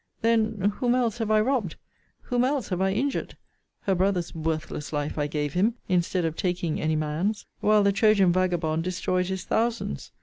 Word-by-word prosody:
Then, 220 -3 +2
whom 245 -1 +2
else 240 -2 0
have 225 -2 -1
I 215 0 +4
robbed? 225 - 0 0.5
Whom 245 0 0
else 265 -1 0
have 180 -1 -1
I 190 0 +2
injured? 270 +8 -2 0.4
Her 195 - +1
brother's 185 -1 0
worthless 155 -2 -3
life 145 -1 -2
I 145 - +1
gave 150 -1 -2
him, 210 +6 +2
instead 180 -1 +1
of 160 -1 -2
taking 175 -3 -1
any 155 0 +1
man's; 155 +8 -1
while 210 0 +4
the 200 - +4
Trojan 200 -3 +4
vagabond 170 -3 0
destroyed 180 0 -1
his 190 -1 -3
thousands. 225 - -1
185 Hz, 175 wpm, -26 LUFS, 165-220 Hz, 0.5 s, I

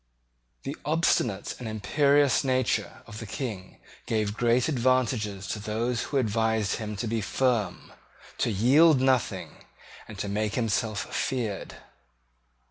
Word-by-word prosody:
The 140 +2 -4
obstinate 150 -10 +1
and 125 - -6
imperious 140 +7 +2
nature 130 -2 0
of 105 - -9
the 110 - -7
King 105 -5 -6 0.3
gave 105 -2 0
great 120 +1 +2
advantages 120 -7 0
to 105 - -3
those 115 +3 -2
who 140 - -2
advised 110 -3 +1
him 105 -1 -5
to 110 - -3
be 115 0 -1
firm, 120 0 -1 0.5
to - - +1
yield 135 - +5
nothing, 130 -2 0 0.4
and 105 - -10
to 100 - -3
make 105 +1 -1
himself 110 -2 -1
feared. 115 -7 -2
115 Hz, 130 wpm, -27 LUFS, 105-130 Hz, 0.5 s, yield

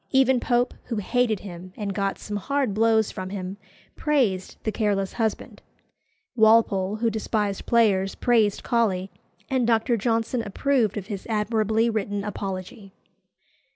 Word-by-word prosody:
Even 265 -1 +4
Pope, 245 +1 +1
who 235 - -3
hated 220 0 0
him 185 -1 -9
and 205 -2 -3
got 195 0 -1
some 210 -1 -5
hard 275 +1 -1
blows 220 0 +3
from 185 0 -6
him, 190 0 -5 0.4
praised 245 - 0
"The 220 - -1
Careless 200 -3 0
Husband;" 220 -3 -3 0.7
Walpole, 220 -3 +4
who 230 +1 0
despised 210 -2 -2
players, 200 -5 +3
praised 220 -4 +2
Colley; 200 -6 0 0.4
and 255 -3 +1
Dr. 230 +1 +2
Johnson 230 +2 0
approved 225 0 0
of 200 - -4
his 200 -2 -6
admirably 220 +1 +1
written 205 -3 -2
Apology. 195 0 -6
215 Hz, 135 wpm, -25 LUFS, 195-235 Hz, 0.7 s, Even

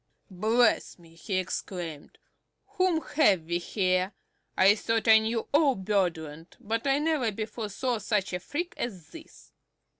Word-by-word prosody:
"Bless 220 +6 +2
me!" 165 -2 -18
he 170 +4 -5
exclaimed, 175 -4 -5 0.5
"whom 370 -5 +1
have 205 - +2
we 170 +2 -2
here? 185 +1 0 0.4
I 195 +2 +6
thought 225 +2 -1
I 220 0 +8
knew 225 +1 -2
all 290 -3 +4
Birdland, 175 -6 -2
but 225 +5 -3
I 275 0 +3
never 295 -6 0
before 215 +1 -5
saw 245 +3 -2
such 205 -2 -1
a 180 - -1
freak 345 - -4
as 190 -9 -5
this!" 325 -1 -14
210 Hz, 145 wpm, -28 LUFS, 185-245 Hz, 0.5 s, I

